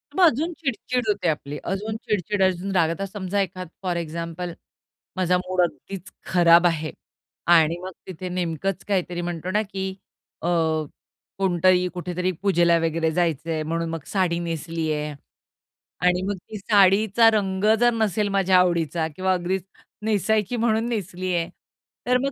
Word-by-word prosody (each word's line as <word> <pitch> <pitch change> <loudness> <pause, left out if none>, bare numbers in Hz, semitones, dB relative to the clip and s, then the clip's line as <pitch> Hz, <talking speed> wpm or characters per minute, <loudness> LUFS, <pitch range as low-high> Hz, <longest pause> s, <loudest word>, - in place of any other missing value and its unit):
मग 380 - +4
अजून 320 +3 +2
चिड-चिड 250 -4 -2
होते 200 -4 0
आपली, 150 -1 -3
अजून 215 +3 -3
चिड-चिड, 205 -2 -2
अजून 185 +1 0
रागावता 170 +3 +1
समजा 200 0 -2
एखादं 185 -2 -4
फॉर 175 -2 -1
एक्झाम्पल 170 +1 -4 0.6
माझा 180 -1 +3
मूड 185 0 0
अगदीच 180 +2 -4
खराब 175 -1 +5
आहे 160 -2 -1 0.6
आणि 165 0 +5
मग 185 - -6 0.2
तिथे 185 0 -6
नेमकंच 180 +2 -2
काहीतरी 180 -3 -1
म्हणतो 175 +1 -4
ना, 210 - +2
की 195 -2 -4 0.5
अ, 170 - -2 0.9
कोणतरी 185 -1 +3
कुठेतरी 180 +1 -2
पूजेला 175 -4 +4
वगैरे 165 0 0
जायचंय 165 -1 0
म्हणून 165 +1 -2
मग 165 -3 -5
साडी 180 -4 +1
नेसलीये 160 -2 -2 0.9
आणि 180 0 +3
मग 205 - -1
ती 215 - -6
साडीचा 205 +2 +5
रंग 195 -2 0
जर 240 0 +5
नसेल 215 -2 +1
माझ्या 195 -2 +3
आवडीचा 170 -3 +1
किंवा 185 +1 +1
अगदीच 180 +1 -1 0.4
नेसायची 215 +1 +1
म्हणून 225 0 +1
नेसली 185 -4 -3
आहे, 170 -1 -1 0.6
तर 250 - +4
मग 275 +2 -1
185 Hz, 145 wpm, -24 LUFS, 170-200 Hz, 0.9 s, खराब